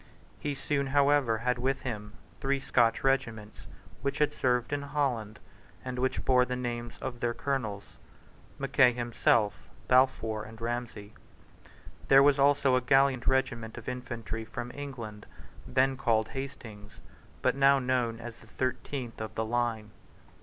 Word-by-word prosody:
He 145 Hz, -1 st, -3 dB
soon, 140 Hz, 0 st, -1 dB
however, 140 Hz, -4 st, +3 dB
had 125 Hz, +1 st, -1 dB
with 135 Hz, +2 st, -1 dB
him 105 Hz, -5 st, -5 dB, 0.2 s
the -, -, -28 dB
three 135 Hz, 0 st, +1 dB
Scotch 120 Hz, -3 st, +2 dB
regiments 115 Hz, -6 st, -1 dB, 0.3 s
which 140 Hz, +2 st, -2 dB
had 150 Hz, -1 st, +2 dB
served 125 Hz, +1 st, 0 dB
in 145 Hz, -, -1 dB
Holland, 135 Hz, -7 st, -2 dB, 0.5 s
and 125 Hz, -1 st, -4 dB
which 130 Hz, +1 st, -1 dB
bore 125 Hz, -1 st, +5 dB
the 125 Hz, 0 st, -2 dB
names 120 Hz, -1 st, -4 dB
of 125 Hz, -2 st, -5 dB
their 120 Hz, 0 st, -1 dB
Colonels, 120 Hz, -8 st, -2 dB, 0.7 s
Mackay 125 Hz, -1 st, +4 dB
himself, 115 Hz, -5 st, +1 dB, 0.2 s
Balfour, 125 Hz, -4 st, +3 dB
and 110 Hz, +1 st, -11 dB
Ramsay. 115 Hz, -3 st, -4 dB, 0.9 s
There 135 Hz, 0 st, +7 dB
was 145 Hz, 0 st, +4 dB
also 140 Hz, -2 st, +4 dB
a 130 Hz, -, +2 dB
gallant 135 Hz, 0 st, +3 dB
regiment 120 Hz, -4 st, 0 dB
of 115 Hz, -, -9 dB
infantry 120 Hz, -3 st, -5 dB
from 120 Hz, +2 st, -6 dB
England, 120 Hz, -7 st, -7 dB, 0.4 s
then 130 Hz, +1 st, +2 dB
called 110 Hz, -4 st, +1 dB
Hastings's, 115 Hz, -6 st, -8 dB, 0.4 s
but -, -, +3 dB
now 140 Hz, 0 st, +5 dB
known 125 Hz, -3 st, 0 dB
as 120 Hz, 0 st, -8 dB
the 110 Hz, -, -17 dB
thirteenth 130 Hz, 0 st, -4 dB
of 110 Hz, 0 st, -6 dB
the 110 Hz, -, -1 dB
line. 115 Hz, -2 st, -1 dB
125 Hz, 145 wpm, -29 LUFS, 115-135 Hz, 0.9 s, There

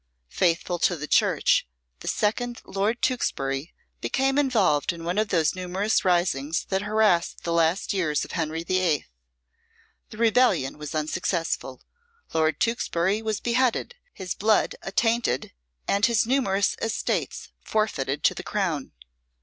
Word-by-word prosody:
Faithful 175 Hz, 0 st, 0 dB
to 175 Hz, -, +2 dB
the 150 Hz, -2 st, -5 dB
Church, -, -, +3 dB, 0.3 s
the -, -, -10 dB
second 240 Hz, +3 st, -1 dB
Lord 205 Hz, +5 st, -1 dB
Tewkesbury 135 Hz, -, -1 dB, 0.3 s
became 270 Hz, +1 st, +1 dB
involved 210 Hz, -, +2 dB
in 170 Hz, -1 st, -9 dB
one 175 Hz, +4 st, -1 dB
of 215 Hz, -, +1 dB
those 165 Hz, -4 st, +2 dB
numerous 185 Hz, +3 st, 0 dB
risings 170 Hz, -5 st, +1 dB
that 190 Hz, 0 st, 0 dB
harassed 210 Hz, -5 st, +1 dB
the 170 Hz, -, -1 dB
last 170 Hz, +5 st, +1 dB
years 155 Hz, -7 st, 0 dB
of -, -, -11 dB
Henry 165 Hz, -1 st, -2 dB
the 185 Hz, +2 st, +1 dB
Eighth. 155 Hz, -, 0 dB, 1.0 s
The 215 Hz, -, -11 dB
rebellion 220 Hz, -, +2 dB
was 150 Hz, +1 st, -6 dB
unsuccessful, 155 Hz, -4 st, -2 dB, 0.5 s
Lord 155 Hz, -2 st, +1 dB
Tewkesbury 210 Hz, -4 st, 0 dB
was 220 Hz, -2 st, -2 dB
beheaded, 250 Hz, -, 0 dB, 0.2 s
his 185 Hz, -2 st, -5 dB
blood 215 Hz, +1 st, +2 dB
attainted, 225 Hz, -, 0 dB, 0.4 s
and 200 Hz, +1 st, +1 dB
his 230 Hz, -1 st, +4 dB
numerous 210 Hz, -6 st, +1 dB
estates 225 Hz, -1 st, -2 dB
forfeited 150 Hz, -10 st, -1 dB
to -, -, +4 dB
the -, -, -6 dB
Crown. 175 Hz, -9 st, -2 dB
185 Hz, 135 wpm, -25 LUFS, 160-220 Hz, 1.0 s, his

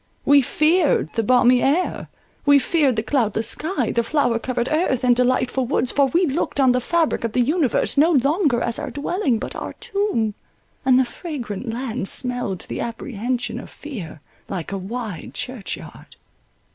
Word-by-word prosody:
We 285 Hz, 0 st, +6 dB
feared 305 Hz, -, +2 dB
the 225 Hz, -, +1 dB
balmy 245 Hz, +2 st, +4 dB
air—we 285 Hz, -2 st, 0 dB
feared 280 Hz, -2 st, +2 dB
the 220 Hz, -, -1 dB
cloudless 225 Hz, -3 st, 0 dB
sky, 300 Hz, -, -2 dB
the 235 Hz, -, +1 dB
flower 245 Hz, -3 st, +1 dB
covered 245 Hz, 0 st, -2 dB
earth, 310 Hz, -6 st, +1 dB
and 245 Hz, -1 st, +4 dB
delightful 255 Hz, +1 st, +1 dB
woods, 255 Hz, -1 st, 0 dB
for 280 Hz, -1 st, +3 dB
we 345 Hz, +7 st, +2 dB
looked 285 Hz, -1 st, -2 dB
on 260 Hz, -2 st, +5 dB
the 250 Hz, 0 st, +1 dB
fabric 330 Hz, +1 st, 0 dB
of 230 Hz, -2 st, -2 dB
the -, -, +1 dB
universe 290 Hz, 0 st, +1 dB
no 315 Hz, +3 st, +5 dB
longer 280 Hz, -, +2 dB
as 235 Hz, -1 st, -1 dB
our -, -, -4 dB
dwelling, 290 Hz, -, -1 dB
but -, -, -6 dB
our -, -, -5 dB
tomb, 400 Hz, -, -1 dB, 0.5 s
and 260 Hz, -1 st, +5 dB
the 260 Hz, -, +3 dB
fragrant 240 Hz, -, -6 dB
land 240 Hz, -3 st, -2 dB
smelled 245 Hz, -7 st, 0 dB
to -, -, -14 dB
the -, -, -4 dB
apprehension 240 Hz, +1 st, -3 dB
of -, -, -10 dB
fear 195 Hz, -, -8 dB, 0.3 s
like 180 Hz, -3 st, -4 dB
a 195 Hz, -, -2 dB
wide 205 Hz, -3 st, -6 dB
church 250 Hz, -5 st, -5 dB
yard. -, -, -13 dB
255 Hz, 170 wpm, -22 LUFS, 230-290 Hz, 0.5 s, We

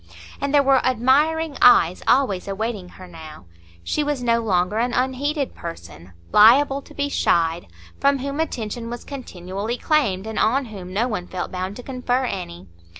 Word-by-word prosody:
And 280 Hz, -, -1 dB
there 285 Hz, -1 st, +4 dB
were 270 Hz, -1 st, +3 dB
admiring 285 Hz, +5 st, +2 dB
eyes 180 Hz, -7 st, +5 dB
always 230 Hz, -9 st, +2 dB
awaiting 200 Hz, -2 st, -4 dB
her 185 Hz, -, -11 dB
now; 160 Hz, -, -12 dB, 0.4 s
she 300 Hz, -, -1 dB
was 290 Hz, -3 st, -2 dB
no 235 Hz, -1 st, +2 dB
longer 195 Hz, -1 st, 0 dB
an 240 Hz, +1 st, 0 dB
unheeded 270 Hz, +3 st, -1 dB
person, 90 Hz, -, -10 dB, 0.2 s
liable 270 Hz, +6 st, +6 dB
to -, -, -17 dB
be 285 Hz, 0 st, -1 dB
chid, 170 Hz, -10 st, 0 dB, 0.3 s
from 280 Hz, 0 st, +3 dB
whom 280 Hz, +3 st, -4 dB
attention 230 Hz, -6 st, -3 dB
was 240 Hz, 0 st, -6 dB
continually 205 Hz, -4 st, -5 dB
claimed, 230 Hz, -13 st, 0 dB
and 220 Hz, -1 st, -4 dB
on 255 Hz, +5 st, +2 dB
whom 195 Hz, -5 st, -9 dB
no 215 Hz, +6 st, 0 dB
one 180 Hz, -7 st, -4 dB
felt 185 Hz, -1 st, -5 dB
bound 185 Hz, +2 st, -4 dB
to 245 Hz, -, -9 dB
confer 255 Hz, 0 st, -1 dB
any. 90 Hz, -, -6 dB
235 Hz, 165 wpm, -22 LUFS, 185-275 Hz, 0.4 s, liable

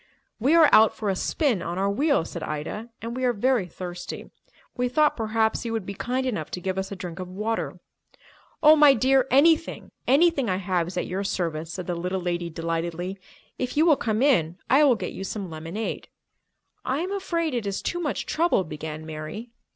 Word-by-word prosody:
"We 275 Hz, +8 st, +3 dB
are 325 Hz, -2 st, +8 dB
out 220 Hz, 0 st, +6 dB
for 210 Hz, -, -2 dB
a 190 Hz, -, +1 dB
spin 255 Hz, -, 0 dB
on 175 Hz, +1 st, -4 dB
our 195 Hz, +1 st, +1 dB
wheels," 280 Hz, -, +1 dB
said -, -, -6 dB
Ida, 155 Hz, +10 st, -5 dB
"and 230 Hz, +1 st, -4 dB
we 255 Hz, -, -3 dB
are 250 Hz, -1 st, +3 dB
very 240 Hz, -2 st, +1 dB
thirsty. 180 Hz, +1 st, -7 dB, 0.4 s
We 250 Hz, -1 st, 0 dB
thought 300 Hz, +4 st, +3 dB
perhaps 220 Hz, -1 st, 0 dB
you 230 Hz, -1 st, -3 dB
would 220 Hz, -4 st, -2 dB
be 200 Hz, -, -5 dB
kind 255 Hz, +6 st, -2 dB
enough 210 Hz, -12 st, -2 dB
to -, -, -4 dB
give 190 Hz, +1 st, -2 dB
us 190 Hz, +1 st, -4 dB
a -, -, -4 dB
drink 180 Hz, -2 st, -7 dB
of 185 Hz, -, -5 dB
water." 210 Hz, +5 st, -3 dB, 0.8 s
"Oh, 305 Hz, +1 st, +9 dB
my 295 Hz, -2 st, +7 dB
dear, 260 Hz, +2 st, +3 dB
anything—anything 295 Hz, -, +2 dB
I 185 Hz, -, +1 dB
have 185 Hz, -3 st, -1 dB
is 180 Hz, -, -7 dB
at -, -, 0 dB
your 190 Hz, +2 st, -3 dB
service," 165 Hz, -4 st, -2 dB
said 185 Hz, -, -5 dB
the 175 Hz, -, -2 dB
little 180 Hz, +2 st, -2 dB
lady 175 Hz, -1 st, -2 dB
delightedly. 170 Hz, +3 st, -3 dB, 0.4 s
"If 255 Hz, +2 st, -3 dB
you 315 Hz, -, +5 dB
will 320 Hz, -4 st, +6 dB
come 220 Hz, -1 st, -1 dB
in, 175 Hz, -, +2 dB
I 275 Hz, +3 st, +6 dB
will 260 Hz, -4 st, +5 dB
get -, -, -5 dB
you 190 Hz, -, -6 dB
some 195 Hz, -2 st, -5 dB
lemonade." 165 Hz, +8 st, -5 dB, 0.8 s
"I 270 Hz, +4 st, -1 dB
am 370 Hz, +3 st, -3 dB
afraid 335 Hz, -6 st, -1 dB
it 235 Hz, -4 st, -2 dB
is 195 Hz, -, -3 dB
too 350 Hz, -, -2 dB
much 310 Hz, -4 st, -2 dB
trouble," 330 Hz, -, +2 dB
began 155 Hz, -1 st, -7 dB
Mary. 160 Hz, +9 st, -7 dB
210 Hz, 205 wpm, -25 LUFS, 180-265 Hz, 0.8 s, Oh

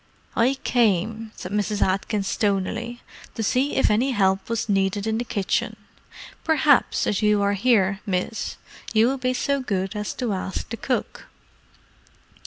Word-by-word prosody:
"I 250 Hz, +4 st, +3 dB
came," 220 Hz, -1 st, +1 dB
said 180 Hz, -, -7 dB
Mrs. 210 Hz, 0 st, -1 dB
Atkins 195 Hz, +1 st, 0 dB
stonily, 220 Hz, +4 st, -1 dB, 0.3 s
"to 225 Hz, -, -2 dB
see 260 Hz, +6 st, +1 dB
if 265 Hz, -, +3 dB
any 250 Hz, +6 st, +2 dB
help 190 Hz, -2 st, +1 dB
was 230 Hz, -2 st, -1 dB
needed 195 Hz, 0 st, +1 dB
in 220 Hz, 0 st, 0 dB
the -, -, -1 dB
kitchen. 200 Hz, -4 st, -1 dB, 0.7 s
Perhaps, 300 Hz, -3 st, +3 dB
as 205 Hz, -, 0 dB
you 210 Hz, -1 st, +3 dB
are 200 Hz, 0 st, +2 dB
here, 200 Hz, -3 st, +2 dB
miss, 195 Hz, +3 st, -2 dB, 0.4 s
you 225 Hz, +3 st, +5 dB
would 270 Hz, -1 st, -3 dB
be 255 Hz, 0 st, 0 dB
so 280 Hz, +2 st, 0 dB
good 195 Hz, -5 st, -2 dB
as 210 Hz, 0 st, -3 dB
to 240 Hz, -5 st, -1 dB
ask 190 Hz, 0 st, -4 dB
the 230 Hz, -, -3 dB
cook?" 250 Hz, +3 st, -3 dB
215 Hz, 155 wpm, -24 LUFS, 195-240 Hz, 0.7 s, you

